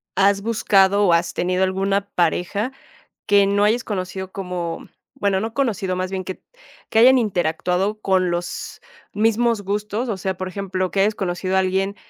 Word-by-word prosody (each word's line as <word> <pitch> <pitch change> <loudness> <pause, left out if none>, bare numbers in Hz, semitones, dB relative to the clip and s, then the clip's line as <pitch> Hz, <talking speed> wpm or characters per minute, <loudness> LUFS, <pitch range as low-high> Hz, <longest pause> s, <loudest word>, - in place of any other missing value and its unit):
¿has 200 0 +3
buscado 205 -2 +3
o 175 - +4
has 170 +1 +1
tenido 180 +1 0
alguna 195 +1 0
pareja 180 +7 0 0.6
que 200 -1 +5
no 200 +1 +2
hayas 230 +4 +2
conocido 190 -2 -4
como, 180 -3 -5 0.3
bueno, 200 -7 0
no 225 +2 -3
conocido 210 -9 -1
más 185 0 -2
bien 190 -1 -3
que 185 - -7 0.5
que 220 - +2
hayan 255 +2 +7
interactuado 185 0 0
con 185 -3 +1
los 175 0 -4 0.3
mismos 225 0 +1
gustos? 210 +4 -2
O 210 - -1
sea, 190 0 -3
por 185 0 -4
ejemplo, 185 -1 -3
que 195 - 0
hayas 210 +2 +3
conocido 185 0 -2
a - - +5
alguien, 190 +2 -1
195 Hz, 170 wpm, -21 LUFS, 185-210 Hz, 0.6 s, hayan